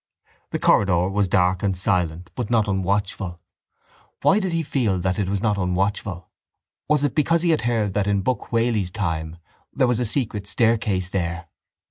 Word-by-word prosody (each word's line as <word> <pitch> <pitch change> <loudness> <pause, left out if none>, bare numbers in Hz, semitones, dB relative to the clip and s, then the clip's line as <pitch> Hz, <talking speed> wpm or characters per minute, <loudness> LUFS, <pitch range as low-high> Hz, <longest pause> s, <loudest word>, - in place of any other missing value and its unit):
The - - -2
corridor 90 -2 +3
was 100 0 +1
dark 90 -1 +2
and 95 -3 0
silent 90 -2 -1
but 125 -4 -4
not 110 -3 +2
unwatchful. 95 -2 -1 0.8
Why 195 - +5
did 190 -3 -2
he 165 -1 0
feel 120 -10 0
that 95 +3 -1
it 95 -2 0
was 100 -1 -1
not 105 -3 +1
unwatchful? 90 0 -1 0.6
Was 150 -2 +3
it 145 - +1
because 165 +2 +2
he 170 - +3
had 155 - +2
heard 115 -4 0
that 105 0 0
in 100 -1 +1
Buck 130 +4 -2
Whaley's 115 -5 +1
time 80 -5 -3 0.3
there 135 -2 +2
was 125 -2 +1
a 125 - 0
secret 110 -4 -2
staircase 105 -5 +1
there? 85 -3 -3
100 Hz, 175 wpm, -23 LUFS, 90-120 Hz, 0.8 s, Why